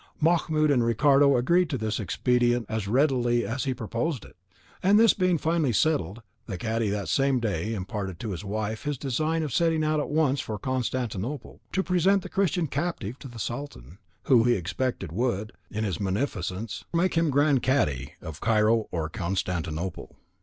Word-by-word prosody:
Mahmoud 155 -2 +2
and 125 -4 +3
Ricardo 140 +3 +4
agreed 170 +8 +3
to 140 - -1
this 110 -1 -2
expedient 120 +2 +1
as 110 -2 -3
readily 120 -1 +2
as 130 +4 -3
he 130 - 0
proposed 120 +5 -3
it, - - -16 0.5
and 200 +3 +5
this 230 -1 +6
being 185 -3 +2
finally 160 -3 +1
settled, 115 - 0 0.2
the 100 -5 -4
cadi 115 0 -1
that 100 -1 -2
same 135 -2 +2
day 110 -1 -2
imparted 95 -2 -5
to 110 - -4
his 90 +1 -5
wife 110 +2 -3
his 145 -1 -2
design 155 +5 -1
of 145 -6 -4
setting 165 0 +2
out 155 0 +1
at 150 - -2
once 150 -3 +2
for 110 - -5
Constantinople, 125 +1 -3
to 190 - 0
present 185 +2 +2
the - - -7
Christian 185 -3 +1
captive 140 - -3
to - - -9
the 120 -2 -11
Sultan, 105 - -6 0.2
who, 125 -4 +5
he 120 0 +3
expected 100 +1 -3
would, 110 +1 -1 0.2
in 110 +1 -3
his 95 -7 -2
munificence, 100 0 -3
make 180 +2 +2
him 165 -1 +2
grand 145 -1 +3
cadi 75 - 0
of 80 -2 -8
Cairo 110 0 +3
or 80 -2 -2
Constantinople. 90 -2 -3
120 Hz, 175 wpm, -26 LUFS, 105-150 Hz, 0.5 s, this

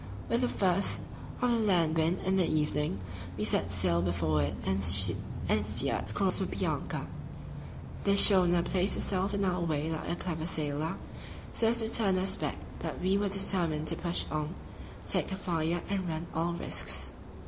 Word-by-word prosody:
With 235 +1 0
the 250 - +1
first 190 -2 +1 0.4
of 245 - +2
the 235 - +1
land 175 -7 +1
wind 165 +3 0
in 190 +1 +1
the 180 -3 +2
evening 150 -8 -2 0.4
we - - -3
set - - +3
sail 85 0 0
before 85 -4 -1
it 70 - -2
and 95 0 -1
steered 95 +1 +4
across - - 0
for - - -2
Bianca. - - -4 1.0
The 200 0 +2
schooner 180 -4 +6
placed 185 +2 0
herself 195 +1 -1
in 200 -1 -1
our 180 -1 -1
way 160 -1 -2
like 160 - -5
a - - -2
clever 165 -3 -5
sailor, 155 -1 -2 0.6
so 225 - +1
as 235 +1 +1
to 220 - -2
turn 205 -4 +1
us 190 +1 -1
back; - - -4 0.2
but - - -6
we 190 +2 0
were 200 0 0
determined 175 -5 +1
to - - 0
push 170 -1 -2
on, 155 +2 -4 0.5
take - - 0
her 190 - -5
fire, 170 -2 -2
and 195 -3 -3
run 160 +1 -5
all 170 +1 -2
risks. 170 - -3
175 Hz, 175 wpm, -29 LUFS, 155-195 Hz, 1.0 s, schooner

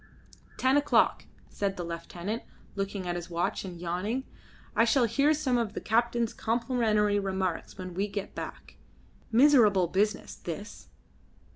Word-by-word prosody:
"Ten 260 +2 +3
o'clock," 290 - +3 0.2
said 200 -1 -2
the 175 - -3
lieutenant, 175 +5 -5 0.3
looking 195 -1 -3
at 175 - -1
his 175 0 -5
watch 170 0 -1
and 180 -3 -7
yawning. 185 +9 -2 0.5
"I - - +5
shall 235 +3 +4
hear 275 +6 +3
some 270 -5 +1
of 225 -3 -2
the - - -3
captain's 235 0 +1
complimentary 220 -3 +1
remarks 190 -3 -2
when 185 -2 -6
we 195 +4 -1
get 200 -1 -5
back. - - -8 0.5
Miserable 230 -7 +6
business, 205 +5 0
this." 190 +5 -7
205 Hz, 140 wpm, -29 LUFS, 185-235 Hz, 0.5 s, Miserable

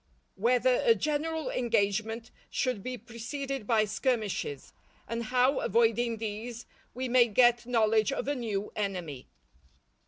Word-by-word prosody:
—_Whether 245 +4 +2
a 460 -2 +5
general 310 0 -2
engagement 225 -1 0 0.2
should 250 -6 -1
be 255 +4 -5
preceded 240 +2 -5
by 220 -2 +3
skirmishes; 215 - -2 0.3
and 230 +1 -3
how, 255 +3 +2
avoiding 230 0 +2
these, 225 +2 -5 0.3
we 255 +1 -2
may 245 -1 +5
get 240 +1 +4
knowledge 220 -1 +3
of 275 - -3
a 285 - +1
new 215 -6 -3
Enemy. 180 -10 -4
235 Hz, 125 wpm, -29 LUFS, 215-255 Hz, 0.3 s, a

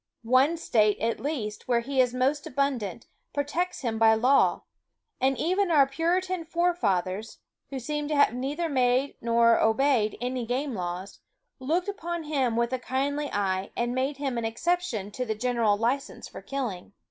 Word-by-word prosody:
One 260 +8 +3
state, 215 -9 +2
at 230 +1 -1
least, 245 -8 -4
where 240 -2 +2
he 265 +2 +1
is 250 -1 +2
most 265 +4 0
abundant, 250 -7 -2 0.3
protects 295 +6 -2
him 225 -3 -2
by 220 0 +6
law; 255 +5 +3 0.6
and 265 0 +2
even 370 - +1
our 295 -4 +6
Puritan 345 +5 -1
forefathers, 225 - -1 0.3
who 275 - -5
seem 295 +3 -3
to 300 - -1
have 285 -5 +4
neither 285 +7 -2
made 260 -1 +1
nor 230 0 +4
obeyed 225 -1 +2
any 250 +1 -2
game 260 +3 -1
laws, 180 0 -5 0.4
looked 325 +8 0
upon 345 -4 -4
him 270 -6 0
with 235 +2 0
a 260 - -1
kindly 280 +3 -2
eye, 195 -1 -1
and 240 +1 0
made 265 +2 -1
him 270 -4 -2
an 230 - -3
exception 230 - -1
to 250 - -3
the 220 -3 -2
general 230 -2 +1
license 245 +6 -2
for - - -10
killing. 230 -10 -5
255 Hz, 165 wpm, -27 LUFS, 225-290 Hz, 0.6 s, by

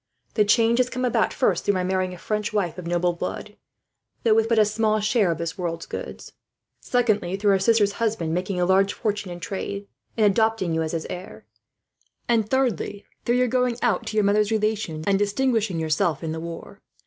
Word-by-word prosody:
The 210 - +3
change 230 +3 +3
has 250 0 +2
come 255 0 -2
about, 235 -3 +1
first - - +1
through 205 - +1
my 185 - 0
marrying 185 0 0
a 180 - -8
French 210 +3 -2
wife 185 -5 -1
of 175 - -7
noble 175 0 +1
blood, 170 - -5 0.7
though 225 - +4
with 225 +1 +2
but 230 - +2
a 215 - +6
small 215 0 +1
share 215 -2 +2
of 165 - 0
this 170 +3 -4
world's 165 -2 -3
goods; - - -7 0.5
secondly 215 -7 0
through 205 0 +2
her 195 - +3
sister's 205 0 +3
husband 210 -7 -1
making 180 +1 -2
a 175 - +2
large 195 +2 +3
fortune 205 -3 -2
in 175 0 -7
trade, 200 +3 -5 0.3
and 220 - +4
adopting 210 -3 +2
you 160 - 0
as 160 0 -3
his 165 -1 -2
heir; 180 +1 -8 0.8
and 225 -3 +2
thirdly, 235 -6 -1 0.2
through 240 - +2
your 250 0 +3
going 250 -1 +1
out 230 -7 +1
to 215 - -3
your 210 - +4
mother's 205 +1 +3
relations, 215 -8 -1
and 195 -1 +2
distinguishing 205 -3 0
yourself 160 0 0
in 160 - -2
the 160 - -4
war. 165 0 -8
205 Hz, 205 wpm, -24 LUFS, 180-225 Hz, 0.8 s, a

